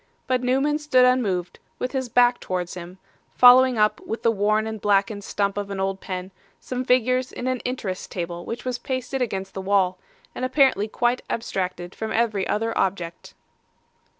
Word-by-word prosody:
But 255 -1 0
Newman 270 +4 +1
stood 260 -4 +4
unmoved, 200 -9 0 0.2
with 250 - -3
his 260 -3 -2
back 245 +1 +4
towards 180 -1 -3
him, 180 +1 -9 0.4
following 255 0 +7
up, 210 0 +2
with 225 - -5
the 230 - +4
worn 215 +1 +1
and 220 -2 -5
blackened 205 +1 +1
stump 200 0 -1
of 200 -1 -5
an 195 -1 -4
old 195 0 -2
pen, 185 0 -5 0.3
some 255 0 -4
figures 255 0 +2
in 250 - -6
an 255 -1 0
Interest 225 -8 -4
table 175 -1 -4
which 235 +6 -6
was 250 -1 -2
pasted 260 +1 -3
against 195 -5 -3
the 190 - -5
wall, 190 -1 +1 0.3
and - - -6
apparently 255 -5 +3
quite 240 +3 0
abstracted 185 -5 -3
from 220 0 -5
every 220 -4 0
other 225 +2 -1
object. 175 -3 -2
220 Hz, 175 wpm, -24 LUFS, 195-250 Hz, 0.4 s, following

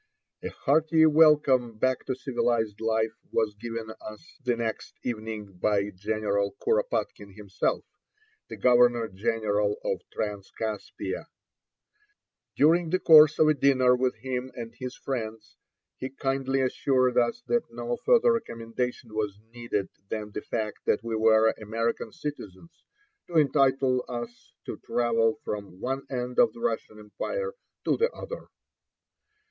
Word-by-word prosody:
A - - -4
hearty 160 +3 +3
welcome 150 -7 +4
back 130 +3 0
to 130 - -1
civilized 120 -5 -1
life 110 0 +1 0.2
was 110 -2 +1
given 115 +1 -6
us 110 +11 -11
the 125 -2 +1
next 115 -2 -4
evening 110 -5 -5
by 105 0 +1
General 100 0 -1
Kuropatkine 450 - -1
himself, 100 -2 -2 0.6
the - - -7
Governor 120 -2 +4
General 105 0 0
of - - -1
Transcaspia. 105 +1 -4 1.3
During 165 +3 +4
the 185 - +2
course 155 -3 +7
of 155 - +5
a 155 - +5
dinner 130 -3 +4
with 125 0 0
him 130 +2 -4
and 115 -1 -7
his 125 +1 -7
friends, 115 -4 -5 0.4
he 130 - -4
kindly 135 0 -1
assured 130 -1 +1
us 120 - 0
that 240 -1 +1
no 120 +1 -3
further 240 -1 +5
recommendation 115 - -4
was 105 -2 -2 0.2
needed 115 -5 -3 0.2
than 105 -1 -4
the - - -5
fact 110 -2 -3
that 105 - +2
we 115 -1 -2
were 110 0 +4
American 115 +1 -2
citizens 150 - -8 0.4
to 170 - -1
entitle 135 -3 +3
us 120 0 -7
to - - -5
travel 115 -2 +1
from 100 -3 -5
one 135 +4 -3
end 125 -1 -3
of 235 - +5
the 235 - -12
Russian 235 - -2
empire 465 - -4 0.3
to - - +2
the 470 +1 +2
other. - - -8
120 Hz, 135 wpm, -27 LUFS, 110-135 Hz, 1.3 s, course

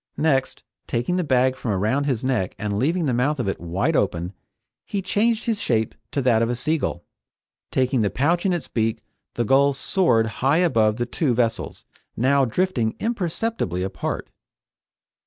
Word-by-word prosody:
Next, 145 -4 0 0.2
taking 120 +10 -1
the 180 - +1
bag 130 -3 +2
from 125 - -5
around 110 +9 +1
his 130 -5 -1
neck 125 -9 -1
and 105 -1 -2
leaving 165 +6 +1
the 130 - +1
mouth 135 +5 +1
of 120 - -1
it 95 - -2
wide 95 - 0
open, 90 -4 0 0.5
he 200 - -3
changed 215 +4 +1
his 225 -3 -1
shape 110 -2 0 0.2
to 140 - -1
that 115 -3 +3
of 115 - +1
a 120 - 0
sea 155 +6 0
gull. 85 -9 -3 0.7
Taking 130 -1 +1
the 105 - +2
pouch 165 - +1
in 195 - +2
its 175 -3 -2
beak 110 -1 -1 0.3
the 120 - 0
gull 140 +4 +4
soared 135 -5 +2 0.2
high 135 +4 +3
above 115 -12 +3
the 120 +1 -1
two 125 +1 0
vessels, 115 -1 -1 0.3
now 135 +3 +3
drifting 125 -4 0
imperceptibly 210 - -2
apart. 95 - -4
130 Hz, 175 wpm, -23 LUFS, 110-160 Hz, 0.7 s, gull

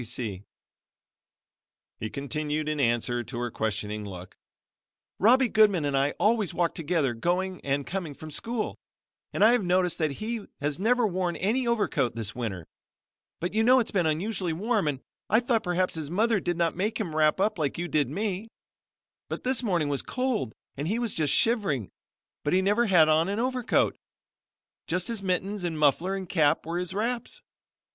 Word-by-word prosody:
You - - -6
see," 110 -4 -4 1.5
he 110 - -3
continued 150 +3 -3
in 155 -1 -1
answer 120 -1 +1
to 120 +1 -8
her 120 0 -2
questioning 105 -1 -2
look, 95 -2 -9 0.8
"Robbie 250 +5 +5
Goodman 205 -8 +4
and 140 -1 0
I 140 +1 +2
always 215 -3 +2
walk 170 -1 +1
together 160 -5 0
going 180 +8 -1
and 140 0 -1
coming 175 -6 -4
from 155 +2 -9
school, 230 +8 -3 0.5
and - - +1
I 220 - +8
have 245 -4 +2
noticed 180 -1 +1
that 155 -3 +1
he 220 - -4
has 145 +1 -2
never 240 +4 +3
worn 180 -3 -1
any 235 +6 0
overcoat 150 - +1
this 115 -1 -2
winter, 100 -9 -4 0.7
but 175 +3 -3
you 220 - +2
know 255 +3 +6
its 235 - -1
been 180 -5 +2
unusually 180 +2 -1
warm 210 +1 0
and 135 -3 -2 0.3
I 220 - +5
thought 240 -2 +1
perhaps 180 0 0
his 155 -3 -4
mother 215 +5 +2
did 175 -1 -2
not 170 -1 +1
make 210 +5 -1
him 175 -8 -3
wrap 155 +2 +3
up 210 -1 +1
like 145 -3 -1
you 175 +1 -2
did 150 -6 +1
me, 200 +5 -2 0.8
but - - -5
this 260 -1 +1
morning 175 -10 +1
it - - -1
was 140 - -1
so - - -24
cold 250 - -1 0.2
and 145 +3 -3
he 215 +6 0
was 235 -2 -1
just 150 -3 +1
shivering, 195 - +2 0.5
but 145 - 0
he 190 +1 +3
never 210 +5 +2
had 170 -5 +6
on 160 +3 +3
any 200 +2 -1
overcoat 250 0 +1 0.9
just 180 +4 -1
his 230 -3 -3
mittens 190 +1 -1
and 165 -3 -2
muffler 155 +6 +2
and 190 -1 -5
cap 155 -4 +2
were 170 +2 -2
his 180 -1 -4
wraps. 235 - -3
175 Hz, 185 wpm, -27 LUFS, 145-215 Hz, 1.5 s, I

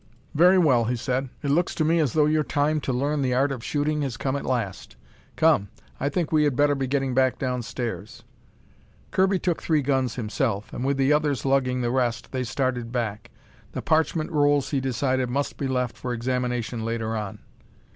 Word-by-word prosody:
"Very 180 +5 +6
well," 130 -10 +4
he 125 +2 0
said. 130 +2 -2
"It 140 - 0
looks 170 +4 +1
to 155 - +1
me 165 +2 +3
as 150 -6 +1
though 155 -2 +4
your 155 0 +2
time 150 +1 0
to 135 - -2
learn 140 +4 0
the 125 -2 +1
art 135 +2 +2
of 125 -4 -5
shooting 150 +2 -1
has 135 -4 -3
come 135 0 -1
at 140 - -4
last. 115 -7 -3 0.4
Come, 155 -12 +3 0.3
I 140 - 0
think 165 +2 -2
we 155 -1 +4
had 145 -4 +1
better 145 +2 +3
be 135 -2 -2
getting 135 -1 0
back 130 0 +2
downstairs." 120 -5 -4 0.9
Kirby 190 +1 +3
took 175 -2 -1
three 155 -3 +1
guns 130 -3 0
himself, 110 -2 -2
and - - -4
with 140 +1 +1
the 135 +2 +3
others 150 -5 0
lugging 130 -2 +1
the 120 -1 0
rest, 125 -2 -1
they 130 -1 -2
started 125 -1 -2
back. 115 -4 -3 0.4
The - - -4
parchment 160 +1 +1
rolls, 145 -3 +2
he 140 - +1
decided, 130 0 0
must 140 +3 -2
be 140 - -2
left 125 -3 -1
for 125 -1 -4
examination 125 -1 -2
later 115 -1 -2
on. 105 -3 -4
130 Hz, 195 wpm, -25 LUFS, 125-145 Hz, 0.9 s, Very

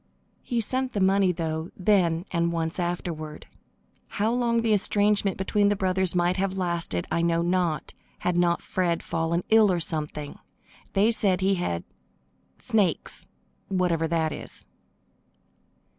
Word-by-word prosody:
He 235 -2 -1
sent 260 +3 -2
the 205 - -1
money, 190 0 +3
though, 160 -1 -3
then 180 -3 +2
and 170 -1 +1
once 165 +1 -2
afterward. 170 -3 -4 0.6
How 215 +3 0
long 235 -1 +1
the 225 -2 +3
estrangement 205 0 +2
between 205 +2 +1
the 205 - +2
brothers 190 -2 0
might 175 +1 +2
have 190 0 -1
lasted 170 - -1
I 170 - +1
know 170 0 +1
not, 175 -4 0 0.2
had 180 - -1
not 175 -1 +2
Fred 175 -2 -1
fallen 165 +1 -1
ill 220 -2 +6
or 175 - +1
something. 150 -2 -3 0.5
They 205 +4 +4
said 195 -5 +2
he 195 +1 +3
had 90 - -2 0.7
"snakes," 200 -8 -1 0.4
whatever 175 -4 +1
that 160 -1 0
is. - - -8
180 Hz, 140 wpm, -26 LUFS, 170-200 Hz, 0.7 s, ill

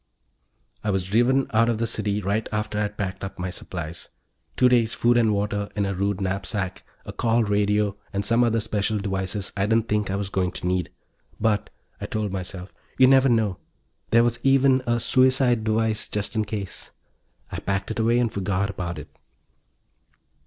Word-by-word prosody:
I 105 - -1
was 95 -2 +1
driven 120 +8 +2
out 115 +2 +4
of 115 - +1
the 115 - 0
city 105 -2 -1
right 100 +4 -1
after 105 0 -2
I'd 105 0 -2
packed 95 -2 -4
up 95 - -6
my 90 0 -3
supplies 85 -3 -6 0.5
two 125 - +5
days' 120 -3 +3
food 120 +1 +3
and 115 -2 +4
water 105 0 -1
in 100 -1 0
a 100 - -1
rude 100 +1 -1
knapsack, 95 0 -3 0.2
a - - -7
call 115 0 +2
radio 105 0 +1 0.2
and 100 0 -2
some 115 +3 +3
other 115 -1 +2
special 105 -1 -1
devices 95 0 -2
I 100 +1 0
didn't 115 +1 +2
think 105 -2 0
I 95 - -1
was 100 -1 -3
going 90 -1 0
to - - -6
need. 90 -1 0 0.5
But, 105 -2 +1 0.3
I - - -3
told 105 -2 -2
myself, 95 0 -6 0.2
you 130 - +7
never 135 0 +5
know... 110 -5 +1 0.5
there 115 +1 +5
was 120 0 0
even 135 0 +4
a 120 0 +2
suicide 130 -2 +3
device, 110 0 0
just 105 +2 -3
in 110 -1 +1
case. 100 -3 -6 0.6
I - - -4
packed 100 +1 -2
it 110 - -4
away 115 +2 +3
and 120 -3 +1
forgot 100 0 -1
about 85 -3 -5
it. 75 - -10
105 Hz, 185 wpm, -24 LUFS, 100-115 Hz, 0.6 s, you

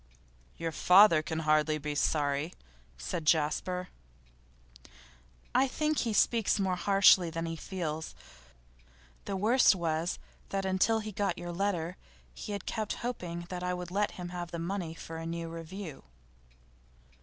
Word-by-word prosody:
'Your 165 -1 -3
father 180 -1 +6
can 160 +1 -3
hardly 155 0 +3
be 150 0 -4
sorry,' 145 +2 0 0.4
said 165 - -4
Jasper. 165 +4 +1 1.6
'I 270 - +4
think 305 +3 0
he 230 - 0
speaks 220 0 +2
more 190 -2 +1
harshly 190 -2 +5
than 165 0 -3
he 165 0 -3
feels. 160 -3 -5 1.1
The 200 - -3
worst 220 +2 +5
was, 165 0 -1 0.3
that 195 0 -2
until 190 +4 +2
he 215 0 -6
got 195 -3 -1
your 175 0 -5
letter 180 -2 -1 0.4
he - - -7
had 200 -2 -4
kept 215 -3 -2
hoping 175 -8 -4
that 180 -1 -4
I 180 0 -1
would 180 -1 -6
let 205 +2 0
him 175 -1 -5
have 175 -1 -5
the 170 - -5
money 170 -1 -3
for 165 0 -8
a 165 - -6
new 165 0 -4
review. 165 - -8
175 Hz, 145 wpm, -30 LUFS, 165-195 Hz, 1.6 s, father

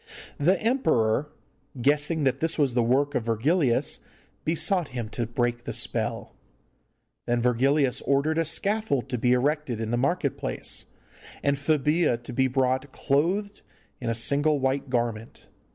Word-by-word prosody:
The 175 +6 +3
emperor, 150 - +1 0.5
guessing 150 +4 +1
that 130 -1 +1
this 165 +2 0
was 140 -5 +2
the 120 - +2
work 135 +5 +1
of 120 - -1
Virgilius, 120 +4 +1 0.4
besought 170 +2 +1
him 115 -3 -4
to 115 0 -3
break 120 0 -2
the - - -4
spell. - - -2 0.9
Then 120 0 +1
Virgilius 130 +3 +2
ordered 145 +4 +1
a 165 - +1
scaffold 195 - 0
to 125 - -2
be 125 +2 +3
erected 135 -2 0
in 110 0 -3
the 120 - +1
market 140 +2 0
place, - - 0 0.6
and 140 0 +2
Febilla 150 0 +1
to - - -8
be 130 +2 +2
brought 130 +1 0
clothed 185 +11 0 0.4
in 120 - -3
a 115 - 0
single 145 +6 +1
white 135 +1 -1
garment. 120 -3 -3
140 Hz, 150 wpm, -26 LUFS, 120-155 Hz, 0.9 s, The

